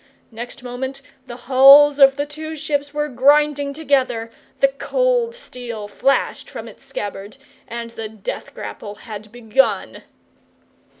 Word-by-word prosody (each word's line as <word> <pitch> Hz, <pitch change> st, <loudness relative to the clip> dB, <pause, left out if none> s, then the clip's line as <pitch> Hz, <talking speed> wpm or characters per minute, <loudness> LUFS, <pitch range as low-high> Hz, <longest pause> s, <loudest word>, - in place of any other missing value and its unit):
Next 240 Hz, +3 st, -8 dB
moment 260 Hz, +2 st, -5 dB, 0.2 s
the 240 Hz, -, -7 dB
hulls 275 Hz, +3 st, +7 dB
of 270 Hz, -1 st, +7 dB
the 285 Hz, +1 st, -2 dB
two 310 Hz, +2 st, -7 dB
ships 285 Hz, -1 st, -2 dB
were 295 Hz, 0 st, -1 dB
grinding 285 Hz, +2 st, +3 dB
together, 260 Hz, -6 st, 0 dB, 0.3 s
the 275 Hz, -, +5 dB
cold 485 Hz, -, 0 dB
steel 235 Hz, -, -8 dB
flashed 270 Hz, +6 st, 0 dB
from -, -, -8 dB
its -, -, -14 dB
scabbard, 205 Hz, 0 st, -6 dB, 0.3 s
and 235 Hz, 0 st, -6 dB
the 225 Hz, -1 st, -6 dB
death 215 Hz, -2 st, -7 dB
grapple 205 Hz, -1 st, -7 dB
had 215 Hz, -1 st, -10 dB
begun. 240 Hz, +2 st, 0 dB
270 Hz, 130 wpm, -20 LUFS, 230-290 Hz, 0.3 s, hulls